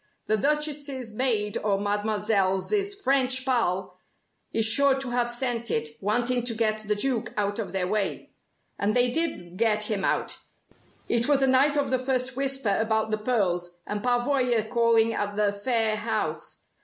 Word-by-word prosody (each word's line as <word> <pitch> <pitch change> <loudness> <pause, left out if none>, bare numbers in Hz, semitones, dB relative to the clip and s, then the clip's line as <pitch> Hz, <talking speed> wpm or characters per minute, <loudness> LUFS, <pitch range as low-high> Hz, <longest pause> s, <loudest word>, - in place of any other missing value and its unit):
The 215 - +2
Duchess's 285 -2 -1
maid 215 -4 +1
or 200 -2 0
Mademoiselle's 205 - 0 0.2
French 260 -7 +2
pal 195 -8 -1 0.5
is 225 -1 +2
sure 270 +5 +4
to 270 -2 -4
have 240 0 0
sent 240 -1 -2
it, 150 0 0
wanting 240 +4 0
to 235 -2 0
get 215 -1 0
the 215 -1 -1
Duke 235 +1 -1
out 205 +1 -1
of 200 -5 -4
their 185 -1 -1
way. 205 0 -2 0.5
And 205 +1 0
they 245 0 +3
did 185 - -1
get 215 -1 +1
him 200 -2 -1
out! - - -1 0.7
It 235 0 +1
was 285 -2 +3
the - - +4
night 270 +3 +3
of 285 -2 0
the 260 - +1
first 255 0 -1
'Whisper' 270 -6 0
about 220 0 0
the 215 - -1
pearls 180 -7 -1
and 210 0 -4
Pavoya 245 -1 +1
calling 230 -1 +2
at 205 -1 -3
the 205 -1 +1
Phayre 220 +1 +1
house. 225 +2 -3
225 Hz, 165 wpm, -26 LUFS, 210-255 Hz, 0.7 s, sure